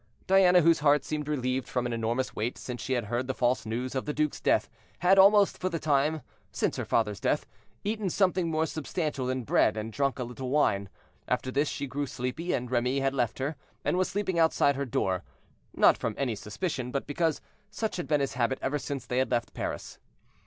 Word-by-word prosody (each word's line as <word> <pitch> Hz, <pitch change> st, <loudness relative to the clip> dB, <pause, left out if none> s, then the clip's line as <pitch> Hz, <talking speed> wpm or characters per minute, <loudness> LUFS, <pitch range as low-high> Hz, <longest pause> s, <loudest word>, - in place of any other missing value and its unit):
Diana, 185 Hz, -2 st, +6 dB
whose 165 Hz, 0 st, +4 dB
heart 145 Hz, 0 st, +3 dB
seemed 150 Hz, -1 st, -3 dB
relieved 130 Hz, -3 st, -1 dB
from 125 Hz, -1 st, -1 dB
an 120 Hz, -, -2 dB
enormous 115 Hz, +3 st, -1 dB
weight 115 Hz, +4 st, -2 dB
since 125 Hz, -3 st, -6 dB
she 130 Hz, -, -2 dB
had 120 Hz, -3 st, 0 dB
heard 120 Hz, +4 st, -2 dB
the 130 Hz, -, -2 dB
false 120 Hz, -2 st, +1 dB
news 125 Hz, +3 st, -3 dB
of 130 Hz, -, -2 dB
the 150 Hz, -, -3 dB
duke's 150 Hz, -1 st, -1 dB
death, -, -, +2 dB, 0.3 s
had, 190 Hz, +2 st, +4 dB
almost 200 Hz, +1 st, +6 dB
for 185 Hz, -, -1 dB
the 165 Hz, -, -2 dB
first -, -, -11 dB
time 150 Hz, +1 st, +2 dB, 0.3 s
since -, -, -1 dB
her -, -, -2 dB
father's 105 Hz, -3 st, 0 dB
death, -, -, 0 dB, 0.4 s
eaten 210 Hz, -1 st, -1 dB
something 185 Hz, -2 st, +1 dB
more 160 Hz, 0 st, +1 dB
substantial 155 Hz, -4 st, -3 dB
than 130 Hz, -1 st, -1 dB
bread, 110 Hz, -1 st, +2 dB
and 110 Hz, +1 st, -4 dB
drunk 140 Hz, +1 st, 0 dB
a 125 Hz, -, -2 dB
little 125 Hz, +2 st, -6 dB
wine. 100 Hz, -9 st, +2 dB, 0.4 s
After 130 Hz, -, -1 dB
this 145 Hz, +3 st, +1 dB
she -, -, -3 dB
grew 140 Hz, +1 st, -3 dB
sleepy, 125 Hz, +9 st, -3 dB
and 125 Hz, -1 st, -2 dB
Remy 125 Hz, +2 st, +1 dB
had 135 Hz, 0 st, +1 dB
left 125 Hz, -4 st, 0 dB
her, 140 Hz, +4 st, -2 dB, 0.3 s
and -, -, +2 dB
was 185 Hz, 0 st, +1 dB
sleeping 190 Hz, -3 st, -1 dB
outside 160 Hz, -3 st, +3 dB
her 140 Hz, +1 st, -2 dB
door, 95 Hz, -5 st, 0 dB, 0.5 s
not -, -, +4 dB
from -, -, -2 dB
any 135 Hz, -4 st, 0 dB
suspicion, 125 Hz, -, -4 dB
but 140 Hz, +2 st, -2 dB
because 160 Hz, +2 st, 0 dB, 0.3 s
such 220 Hz, 0 st, -3 dB
had 175 Hz, -, -4 dB
been 150 Hz, -2 st, +2 dB
his 135 Hz, -, -1 dB
habit 125 Hz, +1 st, 0 dB
ever 145 Hz, +2 st, -1 dB
since 140 Hz, -4 st, -5 dB
they 125 Hz, 0 st, -1 dB
had 130 Hz, -, +1 dB
left 120 Hz, -1 st, -1 dB
Paris. -, -, -5 dB
135 Hz, 215 wpm, -28 LUFS, 125-160 Hz, 0.5 s, Diana